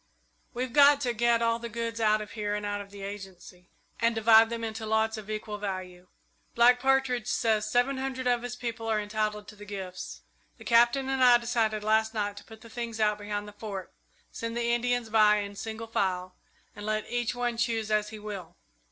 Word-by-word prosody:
"We've 250 0 -3
got 285 0 +7
to 245 -3 0
get 235 0 +2
all 230 0 +1
the 235 0 -6
goods 230 0 -4
out 215 -1 +3
of 210 - -8
here 210 -2 -2
and 210 0 -4
out 205 0 -2
of 200 - -11
the 200 -1 -10
Agency, 190 -2 -9 0.3
and 230 0 +2
divide 225 0 +6
them 230 0 -4
into 220 0 -4
lots 220 0 +1
of 215 -1 -9
equal 215 -1 -4
value. 185 -3 -6 0.5
Black 245 +1 +6
Partridge 265 -3 +1
says 215 -2 +1
seven 245 +4 +2
hundred 265 -1 -3
of 245 -1 +2
his 245 0 -5
people 230 -2 -5
are 220 -1 +1
entitled 210 0 -2
to 210 - -12
the 205 - -12
gifts. 190 -3 -7 0.4
The - - -14
Captain 240 +3 +4
and 265 -1 +1
I 245 -1 +8
decided 225 -3 -1
last 220 +1 +2
night 205 -1 -1
to - - -9
put 220 -1 -14
the 230 - -12
things 235 -2 -5
out 210 -1 +2
behind 205 0 -4
the 210 - -10
Fort, 205 -3 -7 0.4
send 230 0 -5
the 235 0 0
Indians 245 -1 0
by 215 -1 +5
in 205 -1 -3
single 220 +2 -6
file, 185 -4 -2 0.4
and 205 - -9
let 215 0 -2
each 240 0 -1
one 245 -1 -1
choose 225 -2 -1
as 210 0 +1
he 220 - -8
will. 205 -5 -8
220 Hz, 210 wpm, -28 LUFS, 210-235 Hz, 0.5 s, I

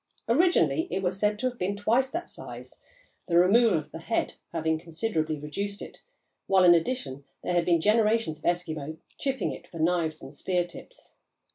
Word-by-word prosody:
Originally 330 +5 +3
it 190 - -2
was 185 +1 -1
said 210 0 +2
to 255 +4 0
have 245 -2 -5
been 190 +3 -1
twice 235 +6 +2
that 340 +5 -4
size, - - -9 0.5
the 170 -2 +2
removal 200 +3 +5
of 155 - -6
the - - -7
"head" 225 +7 -1 0.2
having 160 -1 0
considerably 165 -2 -2
reduced 200 +8 -4
it, - - -10 0.5
while 190 -1 +5
in 175 -1 +8
addition 165 - -1 0.2
there 180 - -1
had 175 -1 +2
been 170 -2 +3
generations 215 -4 +2
of - - -25
Eskimo 160 -3 -1 0.2
chipping 270 -2 -1
it - - -9
for 170 - -11
knives 160 -1 +1
and - - -11
spear 180 -2 0
tips. 180 - -12
180 Hz, 180 wpm, -27 LUFS, 165-225 Hz, 0.5 s, in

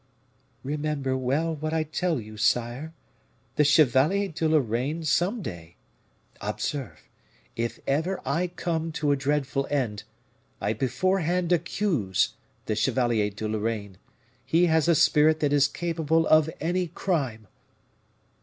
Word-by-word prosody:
"Remember 145 -2 -2
well 140 +6 0
what 155 +1 -3
I 160 - +1
tell 160 0 -1
you, 110 -1 -10
sire; 120 +7 0 0.6
the 150 - +4
Chevalier 150 - +4
de 160 0 -1
Lorraine 140 +2 0
some 185 +8 +1
day 85 - -8 0.7
Observe, 140 -3 -4 0.5
if 115 0 -3
ever 160 +7 0
I 160 +7 0
come 165 -2 -3
to 150 -2 0
a - - +4
dreadful 135 -1 -1
end, 125 -8 -1 0.6
I 105 - 0
beforehand 175 - 0
accuse 160 - +1 0.3
the 110 - -1
Chevalier 115 -2 +1
de 105 +2 -5
Lorraine; 105 -3 -3 0.4
he 165 +8 +3
has 160 -1 +2
a 170 - +5
spirit 155 +1 +4
that 145 -1 +2
is 145 -1 +5
capable 165 -1 0
of 155 0 +5
any 175 +3 0
crime!" 135 - -2
150 Hz, 125 wpm, -26 LUFS, 120-165 Hz, 0.7 s, a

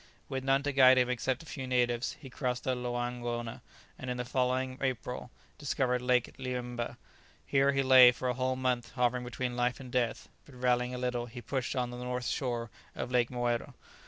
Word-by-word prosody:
With 130 -1 -3
none 135 +1 +2
to 145 - 0
guide 130 -1 +7
him 125 0 +3
except 130 +4 -1
a - - -15
few 135 -4 -6
natives, 120 -1 +1
he 135 -4 -11
crossed 125 -1 -2
the 130 - +1
Loangona, 120 -1 -3 0.4
and 130 - -5
in 125 - -2
the 125 - -3
following 130 +1 0
April 125 -1 -3 0.3
discovered 130 -3 0
Lake 125 -1 +2
Liemmba. 125 -2 -4 0.5
Here 140 0 +3
he 135 0 +1
lay 130 -2 +9
for 125 +1 -4
a 125 - +1
whole 130 +1 0
month 125 -2 -1
hovering 125 0 +1
between 125 0 -3
life 125 0 0
and 130 -2 -9
death, 120 -3 0 0.2
but 140 - -16
rallying 125 0 +1
a - - -4
little 125 -1 -2
he 120 +1 -9
pushed 130 +2 -3
on 125 -1 -1
to 120 - -7
the 125 - -6
north 125 0 -3
shore 120 -2 -2 0.2
of 125 - -4
Lake 120 -1 +3
Moero. 120 -1 -2
125 Hz, 200 wpm, -31 LUFS, 120-130 Hz, 0.5 s, lay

